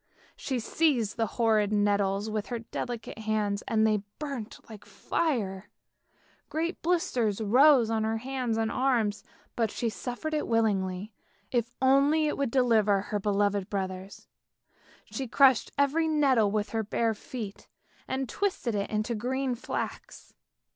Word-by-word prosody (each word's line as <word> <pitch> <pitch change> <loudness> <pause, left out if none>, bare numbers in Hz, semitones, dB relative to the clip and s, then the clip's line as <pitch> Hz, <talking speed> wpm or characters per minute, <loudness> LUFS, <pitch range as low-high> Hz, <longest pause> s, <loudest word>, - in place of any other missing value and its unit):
She 260 -3 -3
seized 235 -3 +1
the 225 -1 0
horrid 215 -3 +3
nettles 205 -1 +1
with 215 -1 -3
her 240 - -3
delicate 230 0 -6
hands, 215 -2 -1
and 220 -1 +2
they 215 -2 +2 0.2
burnt 275 -8 -5
like 215 -2 -11
fire; 210 - -2 0.8
great 335 +3 -2
blisters 250 - 0
rose 245 +2 +5
on 220 -1 +1
her 220 +1 0
hands 250 -1 -2
and 225 0 0
arms, 235 -6 +1 0.3
but 225 -2 +1
she 235 +2 -2
suffered 250 +7 -5
it 305 - -1
willingly 205 -3 0 0.4
if 240 -1 -1
only 280 +4 +4
it 300 - 0
would 280 -3 -1
deliver 225 -5 +3
her 205 +1 -3
beloved 205 -1 0
brothers. 190 -1 -5 0.8
She 270 -2 -5
crushed 265 0 +4
every 290 +4 +2
nettle 270 -9 +3
with 210 0 -1
her 225 - 0
bare 225 +1 0
feet, 215 -1 -8 0.4
and 265 0 -2
twisted 315 - -1
it 200 -1 -2
into 215 +2 -1
green 255 +4 -1
flax. 240 - -6
225 Hz, 140 wpm, -28 LUFS, 210-265 Hz, 0.8 s, rose